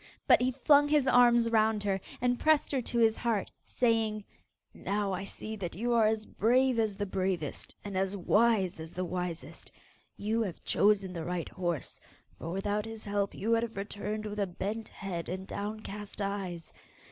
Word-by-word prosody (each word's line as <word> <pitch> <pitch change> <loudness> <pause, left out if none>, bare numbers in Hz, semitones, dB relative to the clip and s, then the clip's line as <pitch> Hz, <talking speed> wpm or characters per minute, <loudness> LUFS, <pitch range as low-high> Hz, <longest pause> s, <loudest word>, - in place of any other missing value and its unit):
But - - +6
he 255 +1 +2
flung 285 +3 +5
his 290 -2 +3
arms 240 -2 +5
round 220 -1 +3
her 195 -2 0 0.2
and 245 0 +1
pressed 310 -1 +3
her 270 -3 +1
to 240 - -3
his 225 -1 +4
heart 230 -4 -1
saying, 225 -3 +1 0.5
'Now 200 -1 -2
I 185 +1 -3
see 220 +2 -6
that 180 -4 -5
you 240 +5 0
are 225 -2 +5
as 215 0 0
brave 250 +2 +2
as 215 -3 +1
the 205 +1 -2
bravest, 185 -5 -2
and 200 -1 -5
as 195 +1 0
wise 205 -2 +2
as 160 0 -8
the 185 0 -1
wisest. 180 -1 -5 0.5
You 220 +3 0
have 195 -6 -4
chosen 200 -2 +3
the 165 -2 -4
right 175 0 -3
horse, 175 -6 -3 0.4
for 165 - -5
without 205 +4 -1
his 225 -1 -7
help 200 -1 -1
you 220 +4 -2
would 230 0 +4
have 230 -3 -5
returned 205 +1 -4
with 210 0 -4
a 200 - +1
bent 210 +5 -4
head 180 -4 -5
and 185 +1 -4
downcast 210 0 -6
eyes. 195 -4 -4
210 Hz, 180 wpm, -30 LUFS, 190-225 Hz, 0.5 s, But